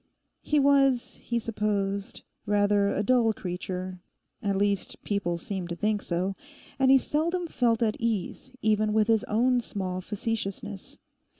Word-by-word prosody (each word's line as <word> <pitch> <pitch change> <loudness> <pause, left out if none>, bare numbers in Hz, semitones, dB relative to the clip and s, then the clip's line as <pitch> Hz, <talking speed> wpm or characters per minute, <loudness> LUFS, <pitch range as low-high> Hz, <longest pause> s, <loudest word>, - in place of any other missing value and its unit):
He 300 - +2
was, 275 -3 +3
he 235 - -3
supposed, 205 -3 -2 0.2
rather 205 0 +3
a 205 - 0
dull 235 -1 +3
creature—at 185 +2 -5
least 200 -1 -1
people 190 -4 -1
seemed 180 0 -4
to 170 - -3
think 210 +3 0
so—and 230 +9 -2
he 270 - +8
seldom 335 +6 0
felt 235 -7 +1
at 220 -1 0
ease 230 +2 -2
even 215 0 +2
with 215 0 +3
his 225 -2 +3
own 245 +3 +2
small 185 -4 -4
facetiousness. 195 - -4
210 Hz, 130 wpm, -27 LUFS, 195-235 Hz, 0.2 s, he